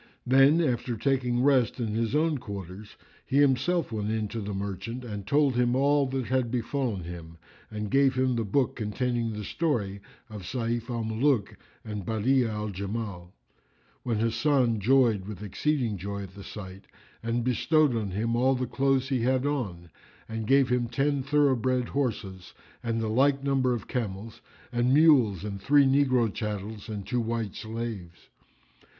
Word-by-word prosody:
Then, 135 Hz, +6 st, +5 dB
after 120 Hz, -5 st, -1 dB
taking 125 Hz, 0 st, +1 dB
rest 130 Hz, -4 st, +3 dB
in 115 Hz, -2 st, -1 dB
his 115 Hz, +4 st, -1 dB
own 155 Hz, -2 st, +1 dB
quarters 100 Hz, -1 st, -8 dB, 0.3 s
he 135 Hz, -, -1 dB
himself 145 Hz, +3 st, +2 dB
went 105 Hz, -1 st, -2 dB
in 110 Hz, -1 st, -1 dB
to 115 Hz, -, -4 dB
the 105 Hz, 0 st, -4 dB
Merchant 100 Hz, +5 st, -5 dB
and 105 Hz, -4 st, -6 dB
told 140 Hz, +2 st, +3 dB
him 120 Hz, 0 st, +2 dB
all 140 Hz, +1 st, +3 dB
that 130 Hz, -1 st, -2 dB
had 130 Hz, -1 st, 0 dB
befallen 120 Hz, -4 st, -2 dB
him 85 Hz, -1 st, -9 dB, 0.3 s
and 105 Hz, -1 st, -5 dB
gave 135 Hz, -1 st, +4 dB
him 130 Hz, -1 st, +1 dB
the 115 Hz, -, 0 dB
book 120 Hz, +5 st, 0 dB
containing 115 Hz, +1 st, -1 dB
the 105 Hz, -1 st, -5 dB
story 105 Hz, -, -2 dB, 0.3 s
of 105 Hz, -3 st, -8 dB
Sayf 115 Hz, +4 st, -3 dB
al 120 Hz, -2 st, -2 dB
Muluk 110 Hz, +1 st, +1 dB, 0.3 s
and 105 Hz, -2 st, -5 dB
Badi'a 115 Hz, +4 st, +1 dB
al 105 Hz, 0 st, -3 dB
Jamal, 100 Hz, -2 st, -5 dB, 0.7 s
when 115 Hz, -3 st, -1 dB
Hasan 115 Hz, +1 st, +2 dB
joyed 115 Hz, -3 st, +3 dB
with 105 Hz, -1 st, -7 dB
exceeding 115 Hz, 0 st, -1 dB
joy 100 Hz, +2 st, -4 dB
at 95 Hz, -1 st, -10 dB
the 100 Hz, 0 st, -10 dB
sight 95 Hz, -2 st, -9 dB, 0.3 s
and 115 Hz, +1 st, -1 dB
bestowed 130 Hz, +3 st, +2 dB
on 110 Hz, -3 st, -2 dB
him 110 Hz, +5 st, -1 dB
all 130 Hz, +2 st, +3 dB
the 125 Hz, 0 st, -1 dB
clothes 135 Hz, 0 st, +1 dB
he 130 Hz, -3 st, 0 dB
had 130 Hz, +2 st, +1 dB
on 95 Hz, -, -3 dB, 0.4 s
and 110 Hz, -1 st, -4 dB
gave 135 Hz, 0 st, +4 dB
him 125 Hz, -1 st, +1 dB
ten 135 Hz, +4 st, 0 dB
thoroughbred 130 Hz, -3 st, +1 dB
horses 105 Hz, -9 st, -3 dB, 0.3 s
and 115 Hz, -1 st, -1 dB
the 110 Hz, -, -1 dB
like 135 Hz, +5 st, +2 dB
number 135 Hz, -2 st, +1 dB
of 115 Hz, -, -7 dB
camels 110 Hz, -3 st, -4 dB, 0.3 s
and 120 Hz, +2 st, +2 dB
mules 130 Hz, -, +5 dB
and 100 Hz, -2 st, -5 dB
three 145 Hz, +3 st, +5 dB
negro 130 Hz, -5 st, +3 dB
chattels 105 Hz, 0 st, -5 dB
and 105 Hz, -3 st, -5 dB
two 125 Hz, -1 st, -1 dB
white 115 Hz, -3 st, -2 dB
slaves. 110 Hz, -6 st, -6 dB
115 Hz, 165 wpm, -27 LUFS, 105-130 Hz, 0.7 s, Then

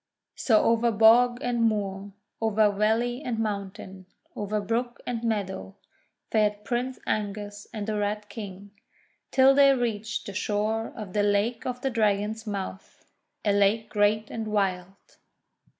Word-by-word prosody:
So 220 Hz, -4 st, +3 dB
over 230 Hz, +1 st, +3 dB
bog 230 Hz, +3 st, +5 dB
and 245 Hz, -1 st, 0 dB
moor, 200 Hz, -3 st, -1 dB, 0.3 s
over 215 Hz, -1 st, +3 dB
valley 225 Hz, +5 st, 0 dB
and 245 Hz, -6 st, -3 dB
moun 205 Hz, -3 st, -2 dB
tain, 190 Hz, -2 st, -12 dB, 0.3 s
over 210 Hz, +1 st, -2 dB
brook 235 Hz, +4 st, -2 dB
and 235 Hz, -2 st, -3 dB
meadow, 200 Hz, -4 st, -3 dB, 0.6 s
fared 210 Hz, -1 st, +1 dB
Prince 250 Hz, +4 st, -2 dB
Angus 205 Hz, 0 st, -3 dB
and 215 Hz, -3 st, -4 dB
the 215 Hz, -1 st, -2 dB
Red 210 Hz, +1 st, -2 dB
King, 200 Hz, -3 st, -9 dB, 0.6 s
till 265 Hz, +1 st, +6 dB
they 275 Hz, 0 st, +6 dB
reached 220 Hz, -3 st, -2 dB
the 200 Hz, -, -6 dB
shore 215 Hz, +3 st, -1 dB
of 205 Hz, -5 st, -7 dB
the 210 Hz, -, +2 dB
Lake 205 Hz, +4 st, +1 dB
of 250 Hz, 0 st, -4 dB
the 270 Hz, -, -1 dB
Dragon's 215 Hz, 0 st, 0 dB
Mouth, 195 Hz, -2 st, -6 dB, 0.4 s
a 205 Hz, -, +3 dB
lake 205 Hz, +2 st, +2 dB
great 210 Hz, +1 st, +1 dB
and 225 Hz, -1 st, -4 dB
wild. 195 Hz, -2 st, -2 dB
215 Hz, 145 wpm, -26 LUFS, 205-230 Hz, 0.6 s, till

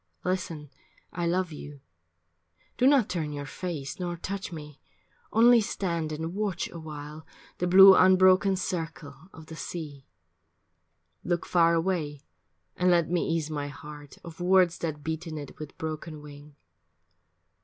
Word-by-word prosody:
Listen, 170 Hz, -5 st, -3 dB, 0.4 s
I 170 Hz, -1 st, -2 dB
love 180 Hz, 0 st, 0 dB
you. 145 Hz, -1 st, -9 dB, 1.0 s
Do 255 Hz, -, +3 dB
not 275 Hz, -6 st, +4 dB
turn 160 Hz, -4 st, -3 dB
your 145 Hz, -1 st, -5 dB
face 150 Hz, -2 st, -6 dB
Nor 175 Hz, -1 st, -3 dB
touch 195 Hz, +3 st, -5 dB
me. 150 Hz, -3 st, -10 dB, 0.5 s
Only 235 Hz, +1 st, +6 dB
stand 170 Hz, -6 st, -2 dB
and 160 Hz, +2 st, -4 dB
watch 195 Hz, -3 st, -2 dB
awhile 155 Hz, -1 st, -8 dB, 0.4 s
The 180 Hz, -, 0 dB
blue 190 Hz, +2 st, +9 dB
unbroken 185 Hz, +1 st, +5 dB
circle 165 Hz, -5 st, -4 dB, 0.2 s
of 160 Hz, -, -13 dB
the 160 Hz, -, -10 dB
sea. 150 Hz, -5 st, -7 dB, 1.2 s
Look 175 Hz, -1 st, -1 dB
far 170 Hz, -1 st, +3 dB
away 165 Hz, -5 st, -2 dB, 0.5 s
and 180 Hz, 0 st, +2 dB
let 170 Hz, -2 st, +3 dB
me 175 Hz, -, +1 dB
ease 160 Hz, -2 st, -1 dB
my 145 Hz, -2 st, -3 dB
heart 145 Hz, -1 st, -11 dB
Of 170 Hz, -1 st, -11 dB
words 180 Hz, -1 st, +3 dB
that 150 Hz, -3 st, -4 dB
beat 160 Hz, +2 st, -4 dB
in 155 Hz, -1 st, -6 dB
it 145 Hz, -1 st, -9 dB
with 155 Hz, -2 st, -9 dB
broken 155 Hz, -1 st, -6 dB
wing. 145 Hz, 0 st, -13 dB
165 Hz, 145 wpm, -27 LUFS, 150-180 Hz, 1.2 s, blue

